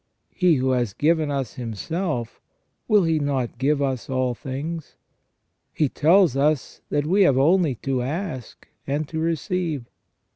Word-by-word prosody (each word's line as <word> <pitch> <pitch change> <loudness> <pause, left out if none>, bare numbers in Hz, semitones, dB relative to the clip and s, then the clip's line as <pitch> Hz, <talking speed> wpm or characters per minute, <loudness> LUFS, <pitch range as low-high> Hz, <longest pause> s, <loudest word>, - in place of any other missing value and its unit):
He 180 -4 +3
who 130 -1 +1
has 120 -5 0
given 155 +2 +2
us 135 -4 -2
Himself, 125 - -4 0.5
will 210 -3 +5
He 165 -2 +2
not 135 -5 -2
give 140 +1 +2
us 130 -2 -2
all 130 -1 0
things? 145 +6 -6 0.8
He 150 -3 +2
tells 170 0 +4
us, 145 0 0
that 145 0 0
we 190 +6 +3
have 140 -9 +5
only 160 0 +3
to 135 -2 0
ask 145 - -5 0.2
and 145 +2 -1
to 160 - -3
receive. 165 -3 -1
145 Hz, 145 wpm, -23 LUFS, 130-165 Hz, 0.8 s, will